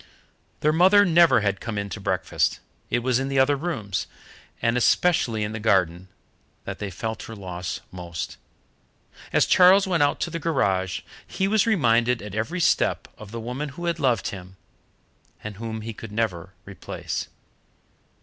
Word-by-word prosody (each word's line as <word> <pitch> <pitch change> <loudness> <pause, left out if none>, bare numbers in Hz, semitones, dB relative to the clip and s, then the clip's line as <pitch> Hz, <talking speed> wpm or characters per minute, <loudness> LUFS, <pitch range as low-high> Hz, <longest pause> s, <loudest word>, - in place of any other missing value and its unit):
Their 150 +1 +3
mother 190 +5 +6
never 170 - +5
had 100 -2 0
come 110 -2 -4
in 100 0 -2
to 105 - -6
breakfast. 95 -2 0 0.3
It 120 - 0
was 125 0 +2
in 135 - -2
the 135 0 -2
other 135 +2 +4
rooms, 135 - -3 0.5
and 115 0 +1
especially 125 -4 +2
in 105 - -3
the 110 - -5
garden, 95 -4 +1 0.6
that - - -6
they 105 - -4
felt 110 +4 -5
her 115 - -8
loss 90 -3 -5
most. 85 -2 -6 0.9
As - - +4
Charles 185 +2 +6
went 175 -5 +1
out 145 0 +2
to 170 - -1
the 170 - -3
garage, 95 - 0 0.3
he 190 - -1
was 215 +2 +2
reminded 120 - +3
at 105 -2 -8
every 115 +12 -2
step 170 - +1
of 110 - -11
the 115 +2 -6
woman 125 +6 -4
who 175 - -5
had 170 -1 -1
loved 125 -8 +1
him 95 -1 -10 0.9
and 105 -2 -7
whom 110 0 -5
he 115 +1 -6
could 110 0 -10
never 95 -5 -2
replace. 100 -2 -5
115 Hz, 170 wpm, -24 LUFS, 100-155 Hz, 0.9 s, mother